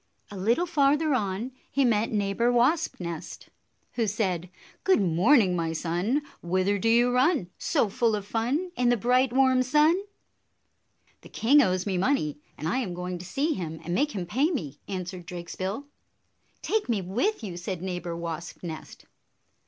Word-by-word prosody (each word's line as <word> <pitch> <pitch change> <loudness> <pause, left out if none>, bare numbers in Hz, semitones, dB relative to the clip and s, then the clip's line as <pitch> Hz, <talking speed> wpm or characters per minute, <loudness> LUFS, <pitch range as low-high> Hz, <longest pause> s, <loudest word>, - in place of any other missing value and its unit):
A - - -7
little 230 - +1
farther 300 -1 +2
on 215 +1 -1 0.2
he 275 -1 +2
met 225 -2 +2
Neighbor 210 +3 +1
Wasp 260 +7 +2
nest, 170 -3 -7 0.4
who 230 -3 0
said, 185 -4 -1 0.3
"Good 380 - +4
morning, 190 - +4
my 165 -1 -1
son! 180 - -1 0.2
Whither 185 +3 +1
do 225 - +1
you 240 +2 +4
run, 255 - +2
So - - +1
full 225 +2 +1
of 205 -1 -5
fun, 255 - -1
In 250 -1 +2
the 245 - +3
bright, 250 +3 +2
warm 260 0 +4
sun?" 300 +6 +4 1.3
"The - - -14
king 280 +6 +4
owes 185 -6 +1
me 190 -3 -1
money, 175 - 0 0.2
and 155 - -4
I 250 +10 +1
am 190 -9 -3
going 180 0 -4
to 180 - -9
see 285 - 0
him 160 - -5
and 175 - -3
make 295 +9 +1
him 185 -3 -3
pay 260 - +1
me," 150 - -4
answered 180 -2 -5
Drakesbill. 185 +7 -5 0.8
"Take 435 - 0
me 210 -5 0
with 240 - -1
you!" 190 -5 -5
said 175 0 -5
Neighbor 180 -2 -4
Wasp 170 +1 -6
nest. 160 -3 -8
210 Hz, 170 wpm, -27 LUFS, 180-255 Hz, 1.3 s, Good